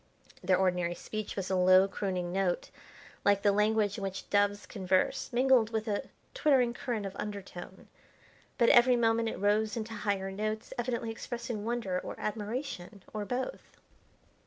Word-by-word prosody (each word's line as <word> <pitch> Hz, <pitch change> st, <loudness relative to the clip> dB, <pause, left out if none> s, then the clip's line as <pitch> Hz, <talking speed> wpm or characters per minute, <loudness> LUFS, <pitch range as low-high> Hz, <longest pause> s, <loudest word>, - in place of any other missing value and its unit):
Their 185 Hz, -, +3 dB
ordinary 180 Hz, -2 st, +1 dB
speech 215 Hz, +2 st, -5 dB
was 195 Hz, -1 st, -3 dB
a -, -, +2 dB
low 185 Hz, +1 st, +6 dB
crooning 185 Hz, -3 st, -3 dB
note, 190 Hz, -2 st, 0 dB, 0.5 s
like 200 Hz, -1 st, +3 dB
the 205 Hz, -, +5 dB
language 210 Hz, 0 st, +2 dB
in -, -, -6 dB
which 195 Hz, 0 st, -4 dB
doves 205 Hz, 0 st, +2 dB
converse, 185 Hz, -3 st, 0 dB
mingled 250 Hz, -2 st, +4 dB
with 220 Hz, 0 st, -2 dB
a 205 Hz, -1 st, -2 dB, 0.2 s
twittering 270 Hz, -, +3 dB
current 235 Hz, -4 st, -3 dB
of 195 Hz, 0 st, -6 dB
undertone. 195 Hz, -3 st, -7 dB, 0.7 s
But 235 Hz, -2 st, +5 dB
every 245 Hz, +1 st, +6 dB
moment 230 Hz, -1 st, +2 dB
it -, -, -5 dB
rose 210 Hz, +3 st, +1 dB
into 225 Hz, 0 st, -4 dB
higher 200 Hz, -3 st, -2 dB
notes, 215 Hz, +2 st, -3 dB
evidently 240 Hz, -2 st, -2 dB
expressing 235 Hz, -1 st, -5 dB
wonder 230 Hz, -6 st, -1 dB
or -, -, -7 dB
admiration, 210 Hz, -3 st, -4 dB
or 210 Hz, -1 st, -3 dB
both. 255 Hz, -, -4 dB
210 Hz, 155 wpm, -31 LUFS, 195-230 Hz, 0.7 s, low